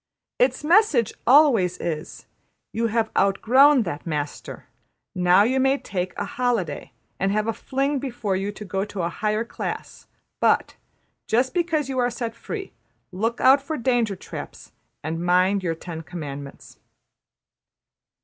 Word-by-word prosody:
'' - - -66
Its - - -5
message 305 - +3
always 240 - +5
is: 155 -3 -5 0.5
``You 230 +1 0
have 220 0 0
outgrown 250 +8 +5
that 170 -4 -6
master; 150 -2 -5 0.5
now 180 +2 +4
you 260 +4 +1
may 270 +1 +3
take 185 -7 -4
a - - -2
holiday 230 -12 -2 0.3
and 195 +1 +1
have 210 +1 0
a 225 - -1
fling 275 +3 -1
before 240 -7 -3
you 195 +2 -2
go 195 -2 -4
into 200 -2 -4
a 170 - 0
higher 215 +4 -1
class; - - -6 0.3
but, - - +2 0.5
just 245 +4 +1
because 330 -5 0
you 265 -1 -2
are 245 0 +2
set 235 -1 -4
free, 390 - -7 0.4
look 225 +6 -2
out 270 +2 +6
for 300 +3 -4
danger 235 -4 +1
traps; - - -9 0.3
and 165 +3 -3
mind 185 +3 +3
your 170 -3 -2
Ten 165 0 -7
Commandments.'' 145 -4 -9
220 Hz, 145 wpm, -23 LUFS, 180-260 Hz, 0.5 s, out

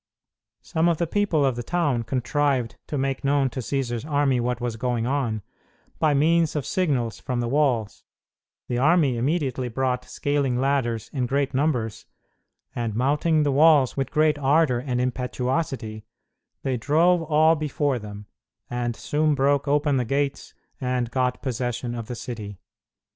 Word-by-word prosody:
Some 165 0 +1
of 170 - +1
the 170 - 0
people 170 -5 +1
of 130 -3 +1
the 120 - -3
town 145 -4 0
contrived 130 0 0
to 150 - -3
make 135 0 -1
known 140 -2 +2
to 130 - -5
Cćsar's 125 -2 -2
army 145 -3 +1
what 120 0 -1
was 120 -2 -3
going 120 0 -1
on, 120 -6 -1 0.6
by 150 -2 +3
means 165 +2 +3
of 150 - -2
signals 135 -11 -1
from 125 -1 -3
the 120 - -1
walls; 125 -5 0 0.6
the 120 - -1
army 150 -2 +3
immediately 130 -1 -1
brought 125 +1 -1
scaling 140 -4 0
ladders 130 -5 0
in 130 -4 -1
great 140 +1 0
numbers, 130 -6 -1 0.7
and, 115 -3 -2
mounting 150 +5 +2
the 145 - +1
walls 145 -2 +5
with 135 -1 -2
great 155 0 +2
ardor 145 -2 +3
and 125 -1 -2
impetuosity, 125 -2 -2 0.6
they 130 -2 0
drove 165 +8 +3
all 160 +1 +4
before 145 -3 -1
them, 105 -1 -9 0.5
and 120 -1 -2
soon 150 +3 0
broke 140 +1 +2
open 145 0 +2
the 125 - +1
gates 140 +3 -2 0.3
and 125 -2 -1
got 125 0 -1
possession 120 -1 -2
of 115 -2 -5
the 120 - -5
city. 110 -5 -7
135 Hz, 155 wpm, -24 LUFS, 120-145 Hz, 0.7 s, walls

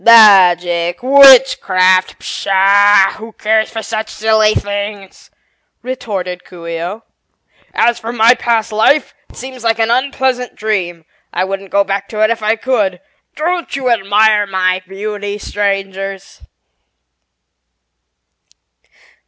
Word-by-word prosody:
"Magic 180 -5 +4
witchcraft? 250 -9 +4
Pshaw, 195 0 +2
who 225 +1 -11
cares 220 +1 0
for 225 0 -6
such 220 0 -5
silly 220 0 +1
things?" 205 -1 -6 0.5
retorted 195 -8 -5
Coo 175 -2 -14
ee 165 0 -5
oh. 200 +6 -6 0.7
"As 240 0 +1
for 230 - -6
my 235 0 +4
past 230 -3 -1
life, 225 +8 +1 0.2
it - - -18
seems 260 -2 -10
like 225 -1 +1
an 225 0 0
unpleasant 260 -1 -1
dream. 180 -6 -3 0.3
I 180 - -1
wouldn't 195 0 -5
go 200 +1 +2
back 200 0 -4
to 215 -1 -2
it 215 - +2
if 230 - -3
I 215 +1 +1
could. 220 -6 -2 0.4
Don't 345 +2 -3
you 260 -3 -1
admire 210 0 +2
my 185 -1 -1
beauty, 205 +1 -6
Strangers?" 195 -1 -4
210 Hz, 120 wpm, -14 LUFS, 195-230 Hz, 0.7 s, Magic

